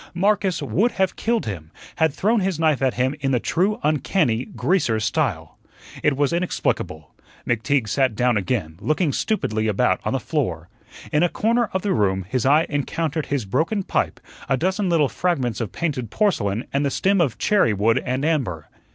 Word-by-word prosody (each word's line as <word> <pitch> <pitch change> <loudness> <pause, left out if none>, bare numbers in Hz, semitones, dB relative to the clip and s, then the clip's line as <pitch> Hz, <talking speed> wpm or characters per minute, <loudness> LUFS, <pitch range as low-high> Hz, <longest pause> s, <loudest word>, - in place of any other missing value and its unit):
Marcus 195 -1 +1
would 235 +6 +1
have 190 -1 0
killed 230 0 0
him; 85 -7 -6 0.3
had 160 -2 +3
thrown 215 +10 +1
his 190 -4 -1
knife 155 -5 +2
at 130 -2 +1
him 130 +2 +1
in 135 -1 -1
the 125 -2 +2
true, 190 - 0
uncanny 130 -4 +1
"greaser" 125 - 0
style. 105 - -2 0.4
It 145 -3 +2
was 145 +2 +1
inexplicable. 175 +1 -2 0.3
McTeague 120 +1 0
sat 130 +2 +1
down 125 +1 +2
again, 95 -5 -2
looking 155 - +1
stupidly 110 - -1
about 105 - +2
on - - -1
the - - 0
floor. - - -2 0.4
In 150 - +2
a 175 - +3
corner 230 +3 +1
of 190 - -2
the 200 -2 +1
room 95 - +1
his 125 +4 0
eye 150 +4 +5
encountered 155 +2 -2
his 140 -6 -1
broken 160 - 0
pipe, - - -1 0.3
a 135 - +2
dozen 190 - 0
little 160 -4 +3
fragments 130 - -1
of 110 - -3
painted 140 -9 -3
porcelain 110 - 0
and 140 +1 +1
the 140 - +1
stem 195 +6 +2
of 125 -10 0
cherry 205 - +3
wood 105 +3 +2
and 130 +3 -1
amber. 115 - -1
145 Hz, 180 wpm, -22 LUFS, 115-180 Hz, 0.4 s, eye